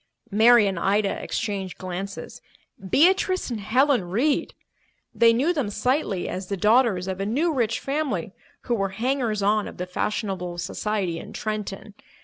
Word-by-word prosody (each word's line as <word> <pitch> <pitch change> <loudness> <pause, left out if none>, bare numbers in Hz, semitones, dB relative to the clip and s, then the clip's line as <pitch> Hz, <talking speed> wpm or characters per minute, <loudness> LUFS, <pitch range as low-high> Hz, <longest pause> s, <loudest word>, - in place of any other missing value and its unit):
Mary 225 +2 +6
and 190 -3 -1
Ida 200 +2 +1
exchanged 200 -5 -3
glances. 190 +2 -6 0.5
Beatrice 370 - +3
and 230 - -3
Helen 250 +1 +2
Reed! 240 +12 0 0.6
They 230 0 +5
knew 270 +10 +2
them 280 -10 -1
slightly 215 - -1
as 185 0 -5
the 200 - -3
daughters 210 -2 +3
of 190 0 -3
a 195 - -1
new 310 +9 +1
rich 230 -4 0
family 275 - -2 0.3
who 240 - -2
were 195 -4 0
hangers 240 -4 0
on 210 +1 +2
of - - -10
the 180 - -3
fashionable 180 -2 -3
society 185 -1 -2
in - - -10
Trenton. 210 -1 -5
210 Hz, 150 wpm, -24 LUFS, 195-250 Hz, 0.6 s, Mary